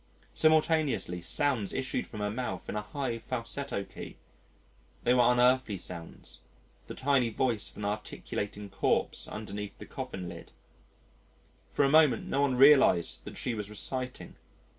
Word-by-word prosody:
Simultaneously 155 - +2
sounds 115 - 0
issued 130 -1 -2
from 105 - -7
her 105 0 -1
mouth 125 +3 -4
in - - -4
a 105 - -1
high 120 +2 -3
falsetto 125 -1 -3
key; - - -10 0.9
they 120 - +4
were 125 -1 +5
unearthly 125 -3 +3
sounds, 85 -2 -7 0.5
the - - -7
tiny 135 -3 +2
voice 115 -1 0
of - - -16
an 105 - -4
articulating 105 0 -4
corpse 100 0 0
underneath 105 -1 -6
the - - -9
coffin 90 -2 -6
lid. - - -10 1.2
For 145 - +2
a - - +4
moment 150 -5 +5
no 140 - 0
one 140 -3 +2
realised 135 - +5
that - - -8
she 125 - -2
was 105 -2 -4
reciting. 125 +4 -4
120 Hz, 145 wpm, -30 LUFS, 105-135 Hz, 1.2 s, were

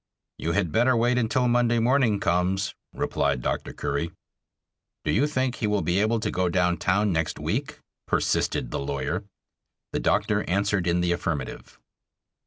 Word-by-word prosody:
"You 85 - -1
had 95 -4 0
better 120 +2 +3
wait 120 +2 +2
until 125 +2 +1
Monday 120 -1 +3
morning 120 -3 +3
comes," 90 +2 0 0.2
replied 70 -3 -1
Dr. - - -2
Curry. 70 +4 -2 1.0
"Do 75 - +1
you 140 - +3
think 130 -4 -1
he 110 - -1
will 105 -1 +1
be 90 +2 +1
able 110 +2 +2
to 105 - -1
go 90 -1 0
down 90 0 +2
town 100 +2 +1
next 80 -2 -1
week?" - - -3 0.3
persisted - - 0
the - - -2
lawyer. 75 +7 -2 0.7
The - - 0
doctor - - +1
answered 100 -1 +1
in 85 +1 +2
the 90 0 +1
affirmative. 75 -6 -3
100 Hz, 160 wpm, -26 LUFS, 85-115 Hz, 1.0 s, better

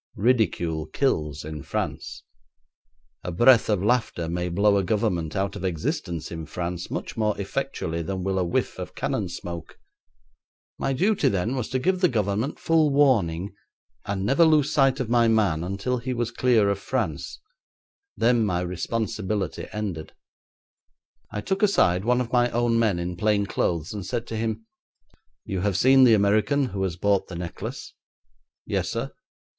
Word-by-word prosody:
Ridicule 85 -9 +1
kills 75 - -1
in 75 -1 -6
France. - - -4 1.0
A 90 - -4
breath 120 +7 +5
of 100 -3 +1
laughter 110 -7 0
may 90 +1 -2
blow 100 +3 +3
a 100 - +1
Government 90 -6 -1
out 100 0 -1
of - - -7
existence 85 -2 -3
in 80 -2 -6
Paris 90 0 -4
much - - -5
more 105 -2 0
effectually 100 -6 -3
than 95 +3 -4
will 95 0 0
a - - +2
whiff 85 - -1
of - - -7
cannon - - -2
smoke. 85 -2 -7 1.0
My 135 - 0
duty 175 +1 +2
then 105 +5 -1
was 125 -4 -3
to 130 - 0
give 185 +7 0
the 180 - +6
Government 110 +3 -1
full 160 -2 +3
warning, 105 - +2 0.5
and 100 -1 -3
never 135 +9 +4
lose 155 -3 +4
sight 135 -2 +3
of 130 - -2
my 120 0 +3
man 100 -8 +2
until 100 +7 -2
he 125 +1 -3
was 120 -1 -2
clear 120 -5 +3
of 100 - -2
France; - - -3 0.8
then 120 0 +3
my 90 -4 0
responsibility 100 +1 -3
ended. 95 -7 -5 1.2
I 105 - -4
took 190 - -2
aside 95 - +3
one 125 +1 +3
of 120 -1 -5
my 120 0 +4
own 120 0 +1
men 110 -6 +2
in 90 0 -4
plain 105 0 +2
clothes 85 -2 -1
and 100 -2 -5
said 120 +4 -3
to 115 - -4
him, 110 0 -3 0.8
'You 95 - -3
have 100 0 0
seen 130 0 +6
the 115 -3 +6
American 105 +7 +2
who 95 -2 -4
has 95 -3 -1
bought 100 +2 +1
the 90 - -8
necklace?' 85 0 -6 0.7
'Yes, - - -1
sir.' - - -3
105 Hz, 165 wpm, -25 LUFS, 90-125 Hz, 1.2 s, the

